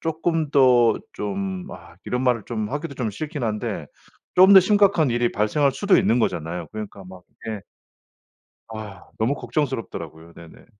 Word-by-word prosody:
쪼끔 160 -1 -1
더 125 -5 +5 0.2
좀 185 - -4
아 - - -13
이런 125 +1 -2
말을 125 -4 +1
좀 110 -3 -3
하기도 145 +1 -4
좀 120 -5 -2
싫긴 150 +5 -6
한데 105 -1 -3 0.5
좀 190 +2 +8
더 190 - +11
심각한 195 - +3
일이 120 0 0
발생할 135 +7 +1
수도 200 +4 +3
있는 120 - +2
거잖아요. 85 -5 -2
그러니까 105 -2 -7
막 90 -1 -12
이게 110 -3 -7 1.1
아 105 -3 -9
너무 115 +6 +1
걱정스럽더라고요. 115 - -4
네네. 85 -1 -14
120 Hz, 310 characters per minute, -23 LUFS, 105-155 Hz, 1.1 s, 더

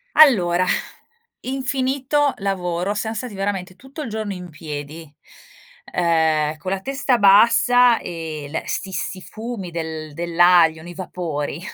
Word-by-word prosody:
Allora, 185 - +5 0.8
infinito 270 +2 0
lavoro, 185 -1 -2
siam 220 +1 -3
stati 230 0 -5
veramente 195 -2 -3
tutto 270 +6 -9
il 250 - -6
giorno 215 -1 -3
in 180 -2 -8
piedi, 155 0 -8 0.8
ehm, 160 -3 +1
con 170 +5 -5
la 195 - -1
testa 270 +2 0
bassa 235 +4 +5
e 160 -3 -6
l 160 - -2
sti 195 - -3
sti 190 0 -4
fumi 220 -4 -7
del 160 -2 -5
dell'aglio, 170 0 +4
nei 175 +1 -10
vapori 165 -4 -4
185 Hz, 130 wpm, -21 LUFS, 165-230 Hz, 0.8 s, Allora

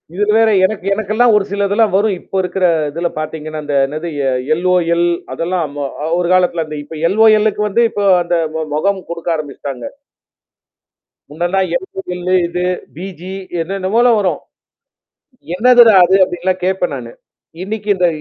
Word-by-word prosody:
இதுல 210 +2 +1
வேற 225 0 +4 0.2
எனக்கு 195 -1 -3
எனக்கெல்லாம் 220 +3 +2
ஒரு 200 - 0
சிலதெல்லாம் 200 +1 +1
வரும். 205 +1 +2
இப்ப 190 - -4
இருக்கிற 185 0 -1 0.3
இல 170 0 0
பாத்தீங்கன்னா, 155 0 -5
அந்த 145 0 -4
என்னது 155 +5 -5 0.2
எ - - +2 0.2
எல்ஓஎல் 175 0 +1 0.3
அதெல்லாம் 170 -1 -2
ம 140 -1 -2 0.3
ஒரு 175 - 0
காலத்தில 175 -3 +2
அந்த 155 0 -7
இப்ப 155 +2 -10
எல்ஓஎல் 215 +1 +4
-லுக்கு 210 - -2
வந்து 220 +4 +2
இப்ப 205 - -4 0.2
அந்த 175 0 -1 0.2
ம 160 0 -2
மொகம் 195 +5 0
குடுக்க 170 0 -5
ஆரம்பிச்சுட்டாங்க. 140 -4 -6 1.5
முன்னல்லா 175 +5 -1 0.2
எல்ஓஎல் 180 0 -7
-லு 185 - +1
இது 175 +1 -4 0.3
பிஜி 180 +1 -8 0.3
என்னன்னவோ 195 +5 -1 0.2
வரும். 190 -3 0 1.2
என்னதுடா 240 +1 +6
அது? 190 +2 +3
அப்டின்லாம் 180 +1 -2
கேட்பேன் 185 -4 -1
நானு. 120 -3 -8 0.5
இன்னைக்கு 210 +1 -5
இந்த 180 -1 +2
185 Hz, 145 wpm, -16 LUFS, 170-200 Hz, 1.5 s, என்னதுடா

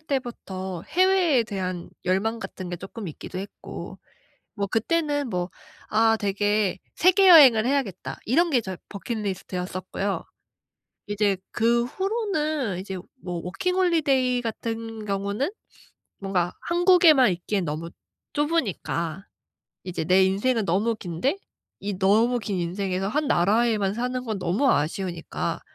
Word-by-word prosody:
때부터 195 - -4
해외에 365 -7 +3
대한 185 -4 -4
열망 205 +5 0
같은 185 -4 -7
게 175 - -3
조금 195 +3 -8
있기도 165 +4 -7
했고 195 - -8 0.6
뭐 200 -2 -1
그때는 290 - 0
뭐 180 -2 -2 0.4
'아. 225 +1 +4
되게 205 0 0 0.2
세계 375 +2 +5
여행을 260 -10 +8
해야겠다.' 255 -9 -1
이런 335 +9 +3
게 255 -6 +3
저의 190 -3 -6
버킷리스트였었고요. 195 -2 -4 0.8
이제 205 -1 +1
그 235 +1 +2
후로는 310 - -1
이제 190 0 -5 0.3
뭐 175 -2 -4
워킹 195 - -2
홀리데이 280 -9 +2
같은 225 -1 -5
경우는 200 - -1 0.7
뭔가 185 -3 0
'한국에만 345 - +5
있기엔 185 +2 -2
너무 160 +2 -4 0.4
좁으니까 200 - -1 0.6
이제 180 -3 -3
내 185 +3 +5
인생은 210 +5 +1
너무 200 +6 +1
긴데 205 - -2 0.4
이 200 -2 -4
너무 220 +6 +3
긴 200 -4 -3
인생에서 185 +2 -2
1 300 +7 0
나라에만 205 +2 +2
사는 250 +2 -2
건 220 -4 -3
너무 190 +10 +1
아쉬우니까 170 +3 -2
210 Hz, 275 characters per minute, -25 LUFS, 190-260 Hz, 0.8 s, 여행을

